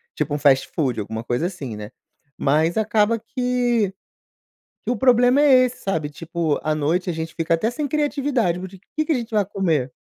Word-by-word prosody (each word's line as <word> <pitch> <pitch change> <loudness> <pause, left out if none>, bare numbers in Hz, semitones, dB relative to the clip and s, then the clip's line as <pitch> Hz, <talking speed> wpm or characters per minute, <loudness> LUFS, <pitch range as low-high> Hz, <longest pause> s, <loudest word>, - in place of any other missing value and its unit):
tipo 145 - -2
um 145 - 0
fastfood, 135 -2 +2
alguma 110 +2 -5
coisa 125 +8 -1
assim, 145 - -6
né, 105 0 -8 0.5
mas 155 +6 +1
acaba 220 +1 +2
que 240 -3 0 0.9
que - - -1
o 245 - -1
problema 250 +3 +4
é 260 -3 +6
esse, 250 0 -5
sabe, 160 -6 -2
tipo 165 0 -2
à 155 0 0
noite 165 +5 0
a - - -1
gente 160 0 -5
fica 165 0 0
até 190 +8 +1
sem 290 +3 -3
criatividade, 275 - 0
tipo, 190 +1 -15
o - - -65
que 310 - +1
que 320 - -1
a - - +1
gente 235 -2 -4
vai 210 -2 +2
comer? 165 -10 -1
185 Hz, 195 wpm, -22 LUFS, 155-245 Hz, 0.9 s, é